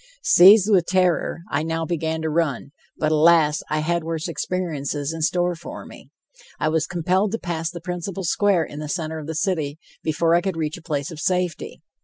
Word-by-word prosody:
Seized 195 +3 +7
with 180 -4 +3
terror, 180 -2 +1
I 140 - +1
now 165 +1 -2
began 160 -1 -2
to 160 - -1
run, 150 -5 -1 0.3
but, 155 0 0
alas, 155 -1 +4
I 155 0 0
had 170 +1 -1
worse 165 0 -3
experiences 155 -4 -3
in 165 - -6
store 175 +2 +1
for 170 - -9
me. - - -14 0.5
I 155 - +1
was 160 -1 0
compelled 185 +4 0
to - - 0
pass 165 -5 -3
the 175 -1 -8
principal 180 +2 -5
square 185 0 +2
in 145 -1 -8
the 150 -1 -6
center 160 -2 -3
of 155 - -8
the 160 - -4
city 155 -4 -1 0.2
before 165 +1 +1
I 170 - +4
could 190 -2 -3
reach 155 -1 -2
a - - -12
place 145 -3 -3
of 160 - -8
safety. 180 -1 -2
165 Hz, 200 wpm, -22 LUFS, 155-180 Hz, 0.5 s, Seized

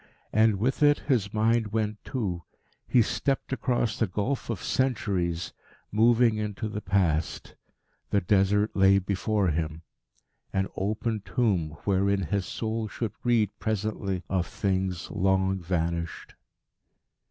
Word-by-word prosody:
And 110 -1 +4
with 125 +9 0
it 145 0 +6
his 115 -8 0
mind 110 +1 +2
went 105 -1 -1
too. 95 -9 -3 0.5
He 120 - +5
stepped 135 +4 -1
across 120 -4 0
the 110 - +2
gulf 105 +9 -2
of 110 -6 -3
centuries, 95 -10 0 0.4
moving 115 +1 +4
into 105 +1 -3
the 105 0 -5
Past. 85 -6 0 0.6
The 100 - +3
Desert 100 +2 +2
lay 95 0 +6
before 100 +1 0
him 80 0 -2 0.7
an 95 0 0
open 110 +3 -1
tomb 90 -6 0
wherein 100 0 +2
his 95 +2 -1
soul 110 0 -3
should 110 +1 -4
read 115 -4 +2
presently 105 -3 -2
of 90 -2 0
things 95 -3 -2
long 95 0 +1
vanished. 85 -1 -2
100 Hz, 125 wpm, -27 LUFS, 95-110 Hz, 0.7 s, it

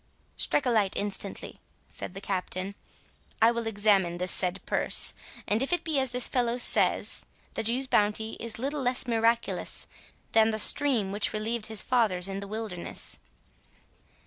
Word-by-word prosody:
"Strike 290 - -1
a 250 - +1
light 210 -4 0
instantly," 200 -1 -4 0.3
said 180 - -6
the 195 - -7
Captain; 190 0 -4 0.7
"I 225 +1 +4
will 235 -1 -4
examine 200 -5 +1
this 180 0 +2
said 185 +1 +1
purse; - - +4 0.3
and 215 +3 0
if 270 - -2
it 355 - 0
be 310 -4 -1
as 265 -1 -1
this 250 0 +2
fellow 245 -1 -1
says, 245 - +4 0.3
the - - -3
Jew's 240 +4 +1
bounty 215 -2 0
is 230 -1 -4
little 280 +4 -4
less 250 0 +1
miraculous 230 0 -1 0.5
than 220 0 +4
the 220 - -2
stream 230 -4 +5
which 205 +1 0
relieved 220 +1 -3
his 220 -1 0
fathers 210 -8 0
in 195 0 -5
the 200 - -8
wilderness." 210 -4 -5
220 Hz, 160 wpm, -27 LUFS, 200-240 Hz, 0.7 s, stream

